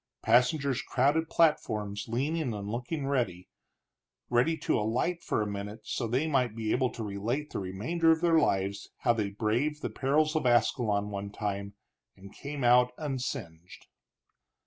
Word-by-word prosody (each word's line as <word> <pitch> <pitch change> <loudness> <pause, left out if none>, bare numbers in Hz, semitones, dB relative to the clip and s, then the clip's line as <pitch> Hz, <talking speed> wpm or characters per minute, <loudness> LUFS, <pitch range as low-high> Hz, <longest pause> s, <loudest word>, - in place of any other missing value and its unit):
Passengers 125 +3 +3
crowded 145 +5 +1
platforms, 105 -11 +1
leaning 135 +2 -1
and 100 -1 -5
looking, 125 +7 -3
ready 120 -11 -1 1.2
to - - +2
alight 125 +11 -1
for 110 - 0
a - - -3
minute, 105 +2 -5
so 120 - -3
they 130 +7 +1
might 130 -7 +1
be 110 -1 -2
able 130 0 +2
to 115 - -5
relate 110 +9 -3
the - - -2
remainder 110 - 0
of 160 0 +5
their 165 -2 +4
lives 100 -6 0
how 120 - +4
they 105 -3 -1
braved 120 +9 -1
the - - -2
perils 155 +4 +1
of 155 -5 +1
Ascalon 110 -3 +2
one 100 0 -4
time 100 -1 -4 0.4
and 100 +1 -13
came 140 -1 -6
out 125 +1 +5
unsinged. 110 - -5
120 Hz, 150 wpm, -29 LUFS, 105-140 Hz, 1.2 s, of